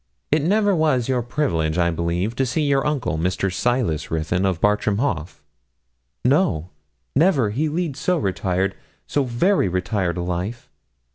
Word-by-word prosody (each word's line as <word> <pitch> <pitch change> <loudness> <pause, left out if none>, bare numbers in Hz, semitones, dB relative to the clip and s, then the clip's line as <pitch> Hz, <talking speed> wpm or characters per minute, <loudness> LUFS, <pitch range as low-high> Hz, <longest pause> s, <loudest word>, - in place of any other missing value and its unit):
'It 155 +1 +3
never 205 +4 +2
was 150 -7 +2
your 130 -2 +1
privilege, 90 - -1
I 85 -1 +2
believe, 85 +6 -1
to 135 - +2
see 155 +5 0
your 140 0 +2
uncle, 125 - -1
Mr. 90 +2 -1
Silas 115 - 0
Ruthyn, 80 +4 0
of 90 -4 -1
Bartram 105 +1 +2
Haugh?' 85 - -2 0.8
'No 100 - +2 0.4
never; 140 - +3
he 150 +8 0
leads 155 -3 -2
so 180 +3 +1
retired 95 - -1 0.3
so 145 - 0
very 130 - +2
retired 90 0 -1
a 90 - -2
life.' 90 +7 -4
110 Hz, 150 wpm, -22 LUFS, 90-145 Hz, 0.8 s, It